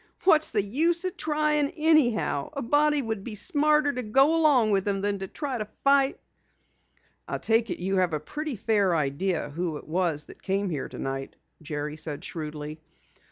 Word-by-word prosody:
"What's 315 -4 +5
the 210 -3 0
use 330 - +2
trying 300 -1 +1
anyhow? 290 - +2
A 280 - -4
body 295 +3 +2
would 220 -4 -4
be 220 -1 -6
smarter 300 - +2
to 250 - -3
go 270 +8 +3
along 285 -9 +4
with 195 0 +1
'em 195 -1 0
than 200 0 -1
to 195 - -5
try 270 - -4
to 215 - -2 0.2
fight." 275 0 +4 1.1
"I - - -3
take 225 0 +1
it - - -3
you 190 +2 -1
have 180 -2 +2
a 155 - 0
pretty 300 - -5
fair 200 -4 +1
idea 155 +3 -1
who 165 0 -3
it - - -12
was 165 -3 0
that - - -15
came 195 0 -1
here 145 -4 -4
tonight?" 135 0 -5 0.3
Jerry 150 0 -5
said 155 -2 -4
shrewdly. 155 -1 -6
210 Hz, 175 wpm, -26 LUFS, -, 1.1 s, What's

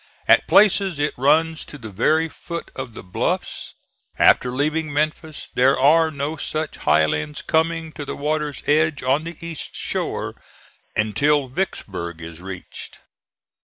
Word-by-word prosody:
At - - +5
places 200 -4 +4
it 145 +1 0
runs 160 +5 +2
to 145 - -10
the 110 -5 -9
very 155 - +2
foot 170 +1 -7
of 130 -4 -6
the - - -8
bluffs. 90 - -3 0.4
After 125 - +5
leaving 150 +4 -1
Memphis, 155 +1 -2
there 130 +2 +4
are 160 +4 +5
no 150 +1 -3
such 155 +1 -3
highlands 75 0 +1
coming 160 0 0
to 150 - -7
the - - -5
water's 150 0 -2
edge 155 0 +2
on 135 +5 +1
the 170 -1 -7
east 165 -3 -6
shore - - -2 0.6
until 140 +6 +2
Vicksburg 95 - -4
is 85 +1 -9
reached. 95 -1 -7
145 Hz, 140 wpm, -22 LUFS, 125-160 Hz, 0.6 s, At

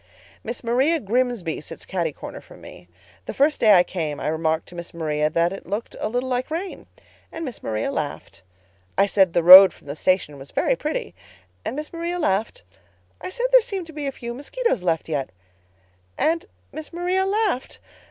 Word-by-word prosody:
"Miss 235 +2 -5
Maria 265 +8 +2
Grimsby 235 - -1
sits - - -10
cati 170 -4 -2
corner - - -9
from - - -16
me. 90 - -13 0.4
The - - -5
first 290 +2 +2
day 215 -3 +7
I 175 - +6
came 155 -6 -4
I - - -2
remarked 160 0 -1
to 175 - -13
Miss 170 0 -8
Maria 150 -2 0
that 170 +3 +1
it 195 - -10
looked 205 +5 -4
a - - -2
little 245 +3 -2
like 255 +1 -2
rain—and 330 -1 -8
Miss 250 -6 -7
Maria 110 +4 -2
laughed. 145 -8 -5 0.6
I 195 - +5
said 190 -3 +2
the 170 - +2
road 185 +3 +11
from - - -21
the 140 0 -6
station 155 -5 0
was 135 +1 -10
very - - +1
pretty—and 435 - -7
Miss 300 +3 -6
Maria 340 +1 -3
laughed. 205 - -1 0.6
I - - -5
said 485 +6 -3
there - - +8
seemed 395 -6 -4
to 325 - -13
be 295 -1 -4
a - - -1
few 235 -2 -7
mosquitoes 375 - -2
left 165 -3 -1
yet—and 90 - -5 0.2
Miss 310 -1 -8
Maria 360 +2 0
laughed. 400 - -1
205 Hz, 180 wpm, -23 LUFS, -, 0.6 s, road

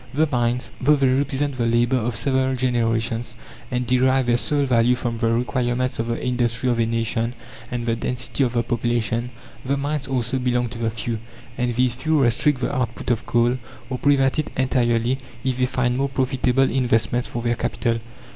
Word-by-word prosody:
The 155 +2 +4
mines, 120 -1 0
though 150 +4 +5
they 135 -2 +2
represent 135 +1 0
the 115 - +2
labour 120 +2 +2
of 120 -1 -1
several 130 +3 +1
generations, 115 -2 0 0.3
and 125 0 -1
derive 130 +1 +3
their 120 0 +3
sole 145 +3 +1
value 125 -1 +3
from 120 -2 -3
the 115 - +1
requirements 125 +2 0
of 115 - -1
the 115 +1 -3
industry 125 0 0
of 120 - 0
a 115 - +2
nation 115 +1 -1 0.3
and 120 -1 -3
the 115 -1 +1
density 125 +3 -1
of 125 -2 0
the 120 -1 +1
population 120 0 -1 0.3
the 140 +2 0
mines 140 0 -2
also 130 0 -1
belong 125 -1 0
to 115 - -8
the 115 -1 0
few; 115 0 -3 0.4
and 125 -1 -1
these 125 -1 +2
few 155 +5 +1
restrict 130 +2 +2
the 140 - -1
output 125 -1 -2
of 115 - -1
coal, 120 +2 +2 0.3
or 130 - -2
prevent 140 0 +3
it 155 - -1
entirely, 125 -1 +1 0.2
if 130 -1 -1
they 125 - +3
find 125 -1 0
more 140 +1 0
profitable 130 -1 +1
investments 120 -1 +1
for 120 - -5
their 120 0 +1
capital. 115 0 -1
125 Hz, 190 wpm, -22 LUFS, 120-130 Hz, 0.4 s, though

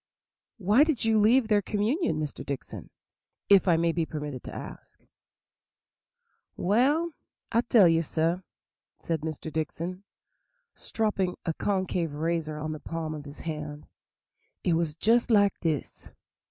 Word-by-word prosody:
"Why 215 +6 +5
did 305 -8 0
you 220 -1 +4
leave 230 +3 +4
their 210 -2 +3
communion, 210 - 0
Mr. 150 -2 -4
Dickson, 140 -2 -6 0.6
if 200 -1 +6
I 170 -2 +5
may 165 0 +2
be 165 0 0
permitted 150 -5 -5
to - - -6
ask?" - - -9 1.6
"Well, 285 - +2 0.4
I'll 230 - +3
tell 230 -6 +5
you, 165 0 +3
sah," 165 +2 0 0.6
said 165 -2 -3
Mr. 155 0 -5
Dickson, 170 +4 -3 0.7
stropping 200 -5 -1
a 165 - 0
concave 185 -5 -1
razor 160 0 -1
on 155 +1 -4
the 155 - -5
palm 165 -1 -4
of 150 -1 -7
his 145 +1 -10
hand, 150 -2 -5 0.8
"it 175 - +2
was 165 -2 0
just 230 +8 +2
like 205 -3 +5
dis. 160 -4 -3
170 Hz, 140 wpm, -28 LUFS, 155-210 Hz, 1.6 s, if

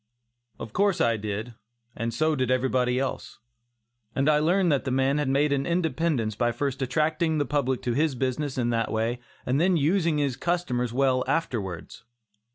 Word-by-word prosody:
Of 110 - -8
course 200 -1 +2
I 115 -1 +3
did, 105 +2 -4 0.4
and 115 +1 -2
so 155 +5 +1
did 130 -2 -1
everybody 125 -1 +1
else, 135 0 -3 0.8
and 135 +2 +1
I 150 -1 +4
learned 175 +3 +2
that 140 - +1
the 135 - -3
man 135 +3 +1
had 145 -3 0
made 140 +2 +2
an 135 -1 -1
independence 160 -8 0
by 120 +3 0
first 140 +1 -3
attracting 155 +4 +1
the 145 - +1
public 130 -2 -1
to 120 - 0
his 150 +1 +1
business 130 +2 -2
in 120 -1 +1
that 115 -1 0
way 115 +2 -1 0.3
and 135 +4 +1
then 180 0 +3
using 165 +1 +2
his 140 -3 0
customers 135 -9 -1
well 130 0 +2
afterwards. 100 - -3
135 Hz, 175 wpm, -26 LUFS, 125-155 Hz, 0.8 s, I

